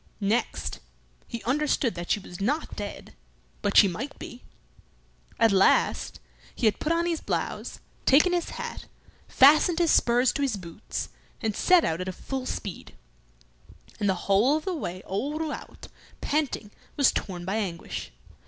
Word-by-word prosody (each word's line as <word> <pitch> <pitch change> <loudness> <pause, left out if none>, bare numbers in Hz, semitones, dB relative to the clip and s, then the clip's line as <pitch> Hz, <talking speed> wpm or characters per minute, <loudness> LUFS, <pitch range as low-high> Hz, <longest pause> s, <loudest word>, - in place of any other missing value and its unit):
Next, 210 +4 -1 0.5
he 235 -2 -6
understood 275 -2 +1
that 175 0 -7
she - - +2
was 180 -1 -10
not 285 +10 -1
dead, - - -7 0.5
but 205 -1 +1
she 205 - +9
might 230 +10 -5
be. 245 - -9 1.0
At 225 -2 +4
last, 195 -1 +3 0.4
he - - -1
had 215 -2 +3
put 310 - -1
on 335 +1 +2
his 335 -2 -1
blouse, - - -3 0.3
taken 305 +7 +5
his 350 -1 0
hat, - - -6 0.4
fastened 310 +5 +6
his 340 -2 +3
spurs 245 +1 +3
to - - -2
his 265 -7 0
boots, 175 +2 -6 0.3
and 215 -2 -2
set 360 -2 +5
out 165 +2 -1
at 185 0 -4
full 265 -1 -5
speed; 195 -4 -6 1.0
and 205 - +1
the 190 - +2
whole 220 +10 +4
of 315 - -7
the 380 - -1
way 185 - -5
old 280 +11 -2
Rouault, 320 -1 -6 0.3
panting, 285 -8 -1 0.3
was 280 -2 +5
torn 175 -3 -4
by 195 +4 -1
anguish. 185 -6 -4
235 Hz, 155 wpm, -27 LUFS, 195-300 Hz, 1.0 s, she